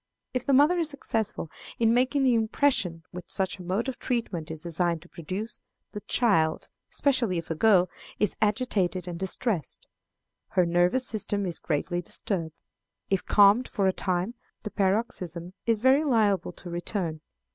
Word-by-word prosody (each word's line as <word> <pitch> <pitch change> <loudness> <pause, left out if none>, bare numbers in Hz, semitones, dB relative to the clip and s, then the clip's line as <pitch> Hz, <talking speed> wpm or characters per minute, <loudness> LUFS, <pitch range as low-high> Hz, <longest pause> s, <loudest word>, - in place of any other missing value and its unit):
If 255 0 -3
the 280 - +3
mother 300 +7 +5
is 325 -2 +1
successful 220 - -2 0.3
in 225 -1 +3
making 260 +3 +2
the 255 -2 +4
impression 220 -7 +1
which 180 0 -9
such 190 -1 -1
a - - -7
mode 190 +7 -1
of 265 - -4
treatment 215 -10 -2
is 160 -1 -5
designed 170 -1 -1
to 175 - -19
produce, 190 +7 -5 0.3
the 210 - -5
child, 180 -12 +1 0.2
especially 250 -10 +1
if 165 0 -5
a - - +2
girl, 185 0 +4 0.3
is 210 -2 0
agitated 205 -5 0
and 170 -1 -5
distressed. 190 - -2 0.7
Her 180 - +4
nervous 175 +9 +2
system 205 -2 +1
is 175 -3 -4
greatly 175 +3 -1
disturbed. 165 -2 -3 0.6
If 195 - +1
calmed 205 +5 +5
for 200 - -1
a 190 - +3
time, 185 +4 -1 0.3
the 210 - -5
paroxysm 185 -4 -1
is 225 -2 +2
very 265 +4 +5
liable 215 - +2
to 175 - -10
return. 170 -2 -3
195 Hz, 160 wpm, -27 LUFS, 175-235 Hz, 0.7 s, mother